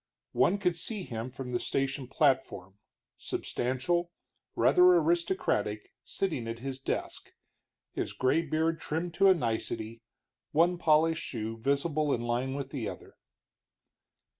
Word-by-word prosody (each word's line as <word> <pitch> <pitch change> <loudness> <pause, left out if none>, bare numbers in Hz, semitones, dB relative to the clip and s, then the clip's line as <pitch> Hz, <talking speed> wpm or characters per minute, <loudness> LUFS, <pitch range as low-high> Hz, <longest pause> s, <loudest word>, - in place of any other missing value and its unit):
One 200 - +3
could 180 -4 +1
see 205 +4 -4
him 115 -4 -5
from 125 0 -7
the 120 - 0
station 135 -1 -2
platform, 130 - 0 0.4
substantial, 130 +8 -1 0.5
rather 180 0 +6
aristocratic, 165 - 0
sitting 140 -6 -3
at 115 0 -4
his 135 +2 -5
desk, 135 - -4 0.6
his - - -3
gray 130 +6 +2
beard 160 +1 0
trimmed 165 +3 -3
to 195 +2 +5
a 190 - +6
nicety, 115 -4 -3 0.5
one 170 +3 +3
polished 160 0 +3
shoe 115 -2 -4
visible 140 +5 0
in 120 - -5
line 120 +3 -1
with 140 -1 -5
the 130 -6 -3
door. - - -8
140 Hz, 130 wpm, -30 LUFS, 120-165 Hz, 0.6 s, rather